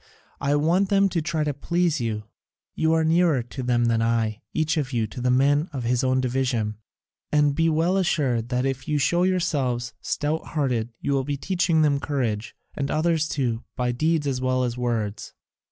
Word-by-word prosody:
I 140 0 +1
want 170 +6 +2
them 195 -1 +4
to 170 -3 -1
try 155 0 -1
to 150 -1 -1
please 170 +1 0
you: 110 -2 -2 0.5
you 160 0 +1
are 160 0 +3
nearer 160 -5 +3
to 120 +3 -7
them 120 -1 +1
than 115 -1 +2
I, 115 -1 0
each 155 +1 0
of 145 -4 -2
you 115 -2 +1
to 115 +4 -8
the 125 - +1
men 145 +5 +3
of 130 -3 -3
his 120 +1 +1
own 130 0 +2
division: 125 -4 -1 0.5
and 150 -1 +3
be 165 +3 +2
well 165 +4 +2
assured 130 -10 0
that 125 0 0
if 135 +1 -3
you 150 -1 +1
show 170 +5 +2
yourselves 145 -10 0
stout 150 +2 -1
hearted 125 -7 -1
you - - -1
will 135 -1 +1
be 145 +1 -3
teaching 170 0 +1
them 145 -2 +2
courage, 120 -7 -2 0.2
and 140 -1 -3
others 160 0 +1
too, 120 -5 -1
by 125 -1 0
deeds 155 +4 0
as 130 -2 -1
well 130 0 +1
as 120 -1 -1
words." 115 -4 -3
140 Hz, 195 wpm, -24 LUFS, 120-160 Hz, 0.5 s, them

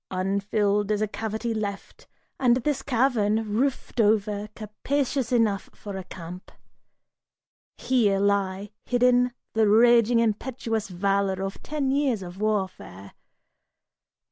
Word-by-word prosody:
Unfilled 200 +2 0
is 210 -1 +1
a - - 0
cavity 220 +2 -3
left, 205 -2 -6 0.3
and 245 -2 +4
this 290 -3 0
cavern, 225 -5 +1
Roofed 255 -1 0
over, 210 -1 +1
capacious 260 +4 -2
enough 220 -5 +1
for 205 -2 -8
a 190 - -5
camp. 180 0 -10 1.3
Here 220 -7 +2
lie 200 0 0
hidden 250 0 +3 0.2
The 220 -1 +3
raging 235 +1 +5
impetuous 225 0 -1
valor 195 +1 0
of 195 0 -5
ten 285 -3 -2
years 270 -7 +1
of 180 +2 -9
warfare. 190 - -3
215 Hz, 115 wpm, -25 LUFS, 200-240 Hz, 1.3 s, raging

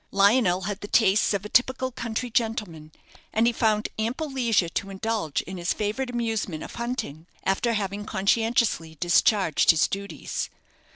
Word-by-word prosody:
Lionel 200 -2 +3
had 205 0 -4
the 205 - -6
tastes 210 -2 +3
of 200 -1 -1
a - - -6
typical 260 +2 +2
country 235 +1 -4
gentleman, 210 -10 -2 0.4
and 225 +1 +2
he 240 - +3
found 215 -2 +1
ample 255 +7 -2
leisure 235 -9 +2
to 195 +3 -3
indulge 195 -5 -2
in 185 +2 -7
his 175 0 -1
favourite 220 +5 -2
amusement 225 -9 -2
of - - -9
hunting, 235 - -4 0.2
after 215 +5 +1
having 205 -1 -3
conscientiously 215 -5 +1
discharged 175 0 +3
his 160 -2 +6
duties. 200 +1 -4
210 Hz, 155 wpm, -25 LUFS, 190-235 Hz, 0.4 s, his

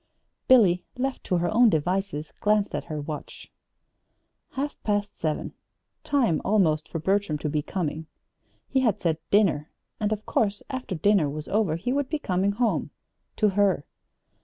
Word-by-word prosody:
Billy, 195 -9 +5
left 265 +1 -2
to 180 - +1
her 175 +4 0
own 235 +1 +6
devices, 175 -2 -1
glanced 210 -1 +2
at - - -3
her 155 -2 -4
watch. 150 0 -7 1.0
Half 285 +2 -4
past 205 -1 -1
seven! 155 -2 -3 0.5
Time, 280 - +1
almost, 160 -7 +2
for - - -3
Bertram 190 -1 0
to 150 - -3
be 150 0 0
coming. 160 -2 -3 0.6
He 270 - +1
had 220 -6 +2
said 165 -2 0
"dinner"; 185 -7 +3 0.3
and, 210 -1 0
of 215 0 -2
course, 205 -2 0
after 255 -7 -4
dinner 180 -2 +3
was 150 +1 -6
over 200 -6 +1
he 210 +10 -2
would 280 -1 -1
be 310 - 0
coming 195 -5 0
home 230 +1 0 0.5
to 215 - +3
her. 195 -6 +2
200 Hz, 160 wpm, -26 LUFS, 160-215 Hz, 1.0 s, own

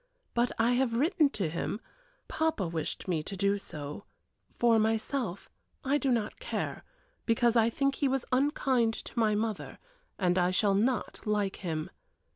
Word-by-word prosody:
But 240 +1 +2
I 230 +2 +3
have 245 -1 +2
written 305 +3 +3
to 200 - -2
him 170 +6 -3 0.5
papa 315 - 0
wished 165 +2 -4
me 170 -4 0
to 195 +5 -6
do 200 +1 +2
so; 150 0 -7 0.5
for 235 -2 +4
myself 220 -2 -1 0.4
I 280 +2 +2
do 275 - 0
not 230 -4 0
care, - - -3 0.4
because 235 0 +3
I 230 -1 +5
think 275 +3 +1
he 280 - 0
was 265 -1 0
unkind 255 -4 +2
to 235 - -6
my 215 -2 +3
mother, 215 -1 -3 0.4
and 180 -1 +2
I 180 0 +3
shall 200 +2 +2
not 235 +6 0
like 205 -2 0
him. 160 -4 -3
225 Hz, 160 wpm, -30 LUFS, 195-255 Hz, 0.5 s, I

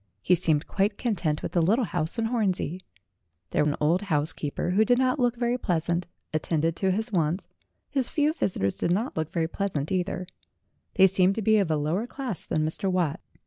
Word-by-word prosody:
He 180 - +4
seemed 160 -3 +2
quite 200 +1 0
content 170 -10 -1
with - - -3
the 175 - +2
little 220 +9 +3
house 160 +1 -2
in 230 - 0
Hornsey. 195 -7 0 0.7
There - - +2
an 150 0 +1
old 160 +5 +2
housekeeper, 155 -2 -1
who 205 +4 +4
did 245 +2 +3
not 255 +2 +2
look 245 -1 +2
very 240 +1 0
pleasant, 170 -2 -1 0.3
attended 160 +1 0
to 190 - +1
his 220 +5 -1
wants; 170 -1 0 0.4
his 270 -4 -1
few 300 0 +1
visitors 100 - 0
did 170 - -1
not 215 +8 0
look 160 0 -2
very 165 -2 0
pleasant 165 -5 -3
either; 185 0 -1 0.7
they 190 - +7
seemed 190 0 +3
to 225 - -2
be 220 +1 +4
of 195 -5 +1
a 155 - +2
lower 165 +10 -1
class 250 - -5
than 155 0 0
Mr. 185 +5 -1
Watt. 175 -6 0
185 Hz, 195 wpm, -26 LUFS, 160-220 Hz, 0.7 s, they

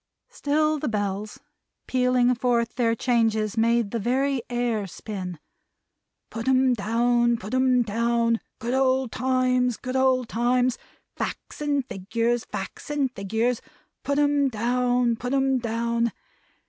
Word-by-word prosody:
Still 305 +1 0
the 300 - -2
Bells, 205 -1 -3 0.5
pealing 250 -1 +2
forth 235 -1 0
their 230 -2 +1
changes, 225 -3 +1
made 230 -2 +2
the 235 - -1
very 265 +4 0
air 240 -4 -1
spin. 185 -1 -6 0.9
Put 230 +2 -5
'em 260 -1 +4
down. 235 +2 +2
Put 210 +3 -8
'em 255 -1 +3
down! 230 +1 +1 0.2
Good 235 +2 -3
old 265 -2 +2
Times, 255 -1 +1
Good 255 0 -5
old 260 -2 +2
Times! 245 +2 +1 0.4
Facts - - -5
and 285 -3 0
Figures, 230 +2 -1
Facts - - -7
and 285 -3 0
Figures! 220 +4 -1 0.4
Put 280 0 -1
'em 290 -1 +3
down, 245 +1 +1
Put 245 +4 -2
'em 270 -1 +2
down! 235 0 -1
240 Hz, 130 wpm, -25 LUFS, 230-255 Hz, 0.9 s, em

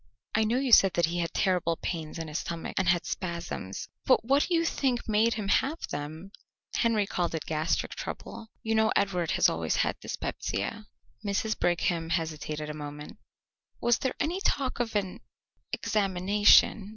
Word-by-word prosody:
"I 215 0 +3
know 230 +3 +1
you 265 -1 0
said 195 -4 +7
that 170 - +4
he 170 +2 -3
had 165 -1 -1
terrible 180 -3 +1
pains 160 -3 -4
in 165 -1 -5
his 150 +1 -3
stomach, 170 -1 -5
and 190 -2 +2
had 175 -1 +2
spasms, 170 - -4 0.2
but 255 -3 +3
what 275 +4 +3
do 355 - +1
you 330 0 +2
think 260 -6 0
made 220 +2 +3
him 210 -3 -3
have 285 +10 +1
them?" 155 +6 -6 0.4
"Henry 225 -3 +2
called 175 -3 -2
it 160 - -4
gastric 155 +1 -1
trouble. 225 - -7 0.2
You 225 - 0
know 220 0 +3
Edward 180 -4 +1
has - - +5
always - - 0
had - - 0
dyspepsia." 220 -2 -4 0.4
Mrs. 210 +2 -1
Brigham 170 -1 0
hesitated 155 -2 -2
a 150 - -4
moment. 150 0 -8 0.6
"Was 240 0 +2
there 260 - -1
any 350 +5 -1
talk 270 -10 0
of 230 -2 -2
an 190 -3 -1 0.5
examination?" 200 +1 +3
190 Hz, 170 wpm, -28 LUFS, 165-225 Hz, 0.6 s, said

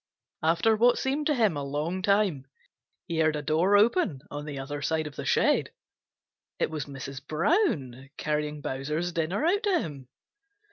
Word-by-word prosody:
After 165 +8 +3
what 240 +3 +4
seemed 285 +3 -1
to 300 - +2
him 220 - +2
a 145 - -3
long 150 +6 -2
time, 195 -9 +1 0.6
he 165 -2 -2
heard 155 -1 +3
a 150 - -3
door 170 +7 +3
open 210 - +2
on 145 0 -5
the 145 -2 -6
other 145 +2 -5
side 160 +2 0
of 150 -1 -7
the - - -6
shed. - - +2 0.9
It - - 0
was 155 -3 -3
Mrs. 135 -1 -7
Brown 150 - 0
carrying 150 -1 -2
Bowser's 150 +7 -2
dinner 170 - -1
out 390 +5 +2
to 400 -6 +2
him. 140 - -7
155 Hz, 170 wpm, -27 LUFS, 145-205 Hz, 0.9 s, what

